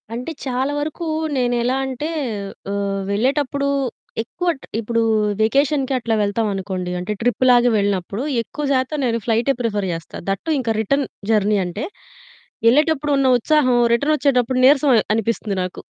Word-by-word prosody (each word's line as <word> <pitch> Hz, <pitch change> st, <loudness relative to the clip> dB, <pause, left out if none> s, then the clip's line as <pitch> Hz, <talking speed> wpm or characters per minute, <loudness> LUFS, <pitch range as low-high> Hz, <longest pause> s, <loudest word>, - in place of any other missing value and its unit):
అంటే 250 Hz, +7 st, -4 dB
చాలా 260 Hz, +2 st, -1 dB
వరకు 310 Hz, +3 st, -4 dB, 0.3 s
నేనెలా 245 Hz, 0 st, +1 dB
అంటే 265 Hz, +4 st, -4 dB, 0.6 s
ఆహ్, 200 Hz, -1 st, -2 dB
వెళ్ళేటప్పుడు 280 Hz, +5 st, 0 dB, 0.6 s
ఎక్కువ 350 Hz, +10 st, -3 dB
ట్ -, -, -12 dB
ఇప్పుడు 230 Hz, +1 st, 0 dB, 0.4 s
వెకేషన్‌కి 275 Hz, +4 st, +2 dB
అట్లా 230 Hz, -2 st, -1 dB
వెళ్తాం 205 Hz, +2 st, 0 dB
అనుకోండి. 185 Hz, -2 st, -4 dB
అంటే 180 Hz, +4 st, -4 dB
ట్రిప్‌లాగా 245 Hz, 0 st, +4 dB
వెళ్ళినప్పుడు 200 Hz, +2 st, -1 dB, 0.2 s
ఎక్కువ 295 Hz, +6 st, -7 dB
శాతం 260 Hz, +3 st, 0 dB
నేను 230 Hz, -1 st, 0 dB
ఫ్లైటే 235 Hz, +4 st, +2 dB
ప్రిఫర్ 205 Hz, -4 st, -1 dB
చేస్తా. 165 Hz, -1 st, -7 dB
దట్ 195 Hz, 0 st, -1 dB
టూ 325 Hz, -, -1 dB
ఇంకా 235 Hz, -3 st, -1 dB
రిటర్న్ 275 Hz, +6 st, +1 dB, 0.3 s
జర్నీ 210 Hz, -1 st, +3 dB
అంటే 180 Hz, +5 st, -5 dB, 0.9 s
ఎళ్ళేటప్పుడు 295 Hz, +2 st, +2 dB
ఉన్న 275 Hz, -1 st, +2 dB
ఉత్సాహం 255 Hz, -1 st, +2 dB, 0.2 s
రిటర్న్ 285 Hz, +6 st, +2 dB
ఒచ్చేటప్పుడు 255 Hz, -3 st, +1 dB
నీరసం 285 Hz, +1 st, +5 dB
అ -, -, +5 dB, 0.2 s
అనిపిస్తుంది 220 Hz, -2 st, -1 dB
నాకు. 180 Hz, -, -6 dB
245 Hz, 145 wpm, -20 LUFS, 210-275 Hz, 0.9 s, నీరసం